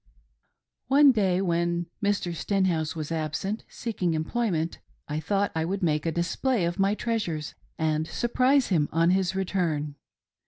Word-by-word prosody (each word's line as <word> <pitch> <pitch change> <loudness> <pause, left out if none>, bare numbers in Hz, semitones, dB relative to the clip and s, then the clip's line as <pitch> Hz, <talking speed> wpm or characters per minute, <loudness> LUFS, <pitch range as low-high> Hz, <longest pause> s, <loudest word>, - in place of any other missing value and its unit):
One 280 +2 +7
day 190 -6 +1
when 170 -1 0 0.2
Mr. 200 -4 0
Stenhouse 170 -4 0
was 155 -1 -5
absent 165 +7 -2
seeking 185 -8 -2
employ 225 +9 -1
ment, 165 -2 -2 0.3
I 150 +1 -2
thought 200 +5 0
I 160 - 0
would 190 +4 -2
make 155 -1 +1
a - - +1
display 175 - 0
of 175 +3 -3
my 195 +2 +3
treasures 210 -11 -2 0.2
and 155 0 0
surprise 255 - +2
him 160 -6 +2
on 165 +2 +3
his 190 0 +1
return. 170 -6 -1
175 Hz, 150 wpm, -27 LUFS, 160-205 Hz, 0.3 s, One